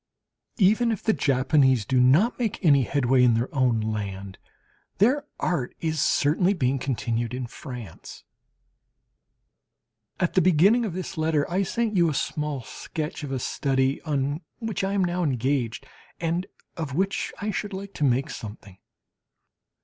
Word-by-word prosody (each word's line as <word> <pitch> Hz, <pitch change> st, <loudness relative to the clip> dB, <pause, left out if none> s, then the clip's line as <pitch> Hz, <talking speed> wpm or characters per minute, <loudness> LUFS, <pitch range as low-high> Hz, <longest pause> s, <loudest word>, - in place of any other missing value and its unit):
Even 220 Hz, +3 st, +4 dB
if 215 Hz, -, -3 dB
the 220 Hz, -, +3 dB
Japanese 130 Hz, -, +2 dB
do 130 Hz, +4 st, +2 dB
not 150 Hz, -, +4 dB
make 220 Hz, -5 st, -2 dB
any 140 Hz, -4 st, +6 dB
headway 130 Hz, 0 st, +2 dB
in 120 Hz, -2 st, +5 dB
their 115 Hz, +3 st, -2 dB
own 125 Hz, -5 st, +2 dB
land, 100 Hz, -3 st, -4 dB, 0.6 s
their 275 Hz, +8 st, +2 dB
art 150 Hz, -9 st, -1 dB
is 160 Hz, -2 st, -1 dB
certainly 175 Hz, +7 st, +2 dB
being 135 Hz, -4 st, 0 dB
continued 120 Hz, -2 st, -2 dB
in 125 Hz, 0 st, -3 dB
France. 120 Hz, -, -9 dB, 2.0 s
At 180 Hz, -, 0 dB
the 185 Hz, -, +4 dB
beginning 185 Hz, +8 st, +4 dB
of 195 Hz, -, -4 dB
this 185 Hz, -1 st, -5 dB
letter 155 Hz, -2 st, +1 dB
I 185 Hz, +3 st, +1 dB
send 215 Hz, +2 st, -1 dB
you 170 Hz, -2 st, +4 dB
a 150 Hz, -, -2 dB
small 150 Hz, -2 st, -2 dB
sketch 155 Hz, +6 st, -6 dB
of 140 Hz, -, -5 dB
a 135 Hz, -, -1 dB
study 135 Hz, +1 st, 0 dB
on 145 Hz, 0 st, -1 dB, 0.2 s
which 220 Hz, -5 st, -3 dB
I 195 Hz, +1 st, 0 dB
am 200 Hz, -2 st, +2 dB
now 180 Hz, 0 st, -1 dB
engaged, 130 Hz, -4 st, -1 dB, 0.3 s
and 170 Hz, +2 st, -1 dB, 0.3 s
of 150 Hz, -5 st, -4 dB
which 195 Hz, +3 st, -1 dB
I 210 Hz, +1 st, -2 dB
should 205 Hz, 0 st, -3 dB
like 200 Hz, +1 st, -7 dB
to -, -, -3 dB
make 135 Hz, +2 st, +1 dB
something. 105 Hz, -3 st, -9 dB
150 Hz, 155 wpm, -25 LUFS, 130-185 Hz, 2.0 s, any